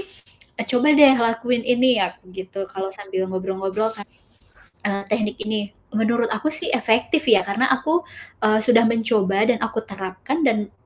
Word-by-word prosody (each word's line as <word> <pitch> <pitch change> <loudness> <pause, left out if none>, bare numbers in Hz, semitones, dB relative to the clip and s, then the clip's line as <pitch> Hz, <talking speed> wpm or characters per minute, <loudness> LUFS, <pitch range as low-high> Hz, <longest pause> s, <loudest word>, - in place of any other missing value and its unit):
"Ih, 390 - -9 0.5
eee, - - -3
coba 250 +2 +2
deh 290 -2 +8
lakuin 235 +2 -1
ini 250 -2 +3
ya," 185 - -1
aku - - -34
gitu 190 +1 -9
kalau 195 0 -4
sambil 190 -1 -4
ngobrol-ngobrol 195 +3 -2
kan 205 -2 -10 0.8
eee, 200 0 -2
teknik 210 -1 -1
ini. 215 0 -2 0.3
Menurut 230 +2 0
aku 220 +7 -2
sih 310 +3 -1
efektif 245 +5 +1
ya, 215 -5 +5
karena 220 +6 +1
aku, 320 +6 0 0.4
eee, 215 0 +3
sudah 230 0 +5
mencoba 220 -3 +1
dan 235 - -2
aku - - -2
terapkan, 195 - -5
dan 215 -4 -1
220 Hz, 165 wpm, -21 LUFS, 195-245 Hz, 0.8 s, deh